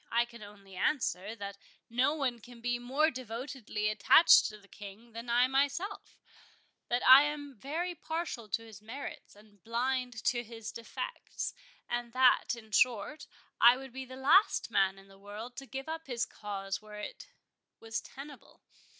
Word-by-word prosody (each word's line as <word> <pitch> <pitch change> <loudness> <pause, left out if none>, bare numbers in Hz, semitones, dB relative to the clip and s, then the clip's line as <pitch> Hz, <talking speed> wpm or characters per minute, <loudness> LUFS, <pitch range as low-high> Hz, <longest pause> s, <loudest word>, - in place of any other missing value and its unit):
I 235 +1 +3
can 235 -1 -14
only 200 -2 -13
answer, 210 - 0
that 200 -1 -7 0.3
no 255 +6 +2
one 260 -6 -1
can 240 +1 -14
be 240 +1 -1
more 275 +6 +2
devotedly 245 -3 -4
attached 215 +9 +7
to 215 - -8
the 200 -1 -20
King 210 +4 -11
than 230 +2 -8
I 240 +1 +5
myself,—that 280 -3 -3
I 260 +2 +11
am 295 -1 -3
very 320 - -3
partial 320 -9 -4
to 225 +3 -2
his 220 -2 -12
merits 245 +3 -8
and 205 -3 -21
blind 245 0 -1
to 240 -1 +1
his 225 -1 -8
defects;—and 240 - -6
that, 255 -1 +4
in 220 -2 -13
short, 255 +7 +1 0.3
I 240 +2 +8
would 265 -2 -10
be 265 0 -6
the 255 0 -10
last 310 +11 +4
man 195 0 +2
in 195 0 -16
the 195 0 -18
world 210 +5 -8
to 270 - -7
give 270 +2 -6
up 325 0 -5
his 245 -2 -1
cause 195 -2 -5
where 210 0 -11
it - - -7 0.5
was 225 0 -4
tenable. 280 +1 -12
240 Hz, 160 wpm, -32 LUFS, 215-270 Hz, 0.5 s, I